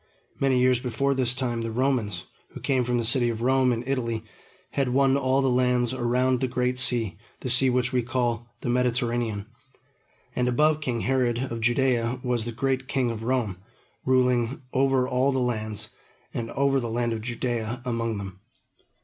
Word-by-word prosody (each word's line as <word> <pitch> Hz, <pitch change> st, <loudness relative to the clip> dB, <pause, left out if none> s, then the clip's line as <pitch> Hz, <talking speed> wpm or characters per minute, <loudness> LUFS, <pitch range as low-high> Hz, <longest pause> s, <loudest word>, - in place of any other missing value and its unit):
Many 135 Hz, -2 st, +2 dB
years 125 Hz, -1 st, +4 dB
before 130 Hz, +3 st, 0 dB
this 125 Hz, -2 st, +1 dB
time, 120 Hz, -3 st, -1 dB
the 115 Hz, -, -3 dB
Romans, 115 Hz, -7 st, -1 dB, 0.3 s
who -, -, -7 dB
came 130 Hz, -3 st, +1 dB
from 125 Hz, 0 st, 0 dB
the 120 Hz, -, 0 dB
city 120 Hz, +1 st, +3 dB
of 115 Hz, 0 st, -3 dB
Rome 130 Hz, 0 st, +3 dB
in 120 Hz, 0 st, -1 dB
Italy, 115 Hz, -5 st, -1 dB, 0.5 s
had 135 Hz, -2 st, 0 dB
won 135 Hz, +1 st, +3 dB
all 135 Hz, 0 st, +2 dB
the -, -, +2 dB
lands 125 Hz, -1 st, +2 dB
around 125 Hz, +1 st, +1 dB
the 130 Hz, -, 0 dB
Great 125 Hz, 0 st, 0 dB
Sea, 115 Hz, -8 st, +1 dB, 0.2 s
the 130 Hz, -, -2 dB
sea 130 Hz, +2 st, +5 dB
which 125 Hz, 0 st, +1 dB
we 125 Hz, -, +3 dB
call 120 Hz, -1 st, -1 dB
the -, -, -3 dB
Mediterranean; 120 Hz, -4 st, 0 dB, 0.9 s
and 125 Hz, 0 st, +1 dB
above 150 Hz, +5 st, +2 dB
king 120 Hz, -5 st, -2 dB
Herod 130 Hz, -1 st, 0 dB
of 115 Hz, -1 st, -4 dB
Judea 120 Hz, 0 st, +1 dB
was 120 Hz, -3 st, 0 dB
the 120 Hz, -, -3 dB
great 130 Hz, +2 st, -1 dB
king 125 Hz, -3 st, 0 dB
of 110 Hz, -1 st, -6 dB
Rome, 115 Hz, -6 st, 0 dB, 0.5 s
ruling 125 Hz, 0 st, +2 dB
over 135 Hz, -1 st, +2 dB
all 130 Hz, +2 st, +2 dB
the 135 Hz, -, -1 dB
lands, 110 Hz, -3 st, -1 dB, 0.4 s
and 115 Hz, -1 st, -3 dB
over 135 Hz, 0 st, +2 dB
the 120 Hz, -2 st, -3 dB
land 120 Hz, 0 st, 0 dB
of 110 Hz, -, -4 dB
Judea 120 Hz, 0 st, -3 dB
among 115 Hz, -3 st, -1 dB
them. 95 Hz, -2 st, -7 dB
125 Hz, 180 wpm, -26 LUFS, 115-130 Hz, 0.9 s, sea